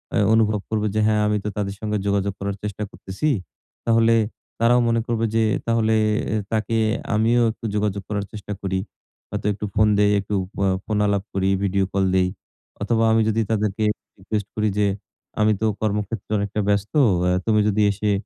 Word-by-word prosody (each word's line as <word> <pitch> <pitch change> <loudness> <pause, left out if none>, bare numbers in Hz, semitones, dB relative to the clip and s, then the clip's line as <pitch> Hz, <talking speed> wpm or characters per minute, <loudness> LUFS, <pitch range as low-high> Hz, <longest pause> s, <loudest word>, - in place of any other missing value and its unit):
আ - - +2 0.2
অনুভব 110 -2 +3
করবে 110 -1 0
যে, - - +2
হ্যাঁ 105 -1 +2
আমি 105 0 +1
তো 105 - -2
তাদের 100 -1 -2
সঙ্গে 105 -1 -1
যোগাযোগ 100 -1 0
করার 100 0 -3
চেষ্টা 105 0 -4
করতেছি। 95 +12 -3 0.6
তাহলে 115 0 +4 0.4
তারাও 120 +2 +4
মনে 115 0 +2
করবে 115 -1 0
যে, 115 - +3 0.2
"তাহলে 115 -1 +2 0.4
এ - - +1 0.2
তাকে 110 0 0 0.4
আমিও 115 +3 +3
একটু 110 - -11
যোগাযোগ 105 -1 0
করার 100 -1 -2
চেষ্টা 105 -1 -6
করি। 95 -1 -1 0.5
হয়তো - - -5
একটু 105 +1 -5
ফোন 110 0 +4
দেই, 105 0 +4
একটু 100 +1 -3
এ - - -15
ফ - - -7 0.3
ফোন 105 -1 -1
আলাপ 100 -1 0
করি, 95 0 +1
ভিডিও 95 0 +1
কল 95 0 +2
দেই" 90 -1 +3 0.5
অথবা 115 +2 +1
আমি 110 0 +4
যদি 110 +1 +1
তাদেরকে 105 -1 0 0.3
রিকুয়েষ্ট 105 +1 -3
করি 110 0 +1
যে 105 - +3 0.5
আমি 110 0 +4
তো - - +2 0.2
কর্মক্ষেত্রে 105 +1 -2
অনেকটা 100 +1 -2
ব্যস্ত। 100 0 0 0.3
অ্যা 90 0 +2
তুমি 110 -1 +3
যদি 105 +1 +1
এসে 105 +1 -1
105 Hz, 185 wpm, -22 LUFS, 100-110 Hz, 0.6 s, তাহলে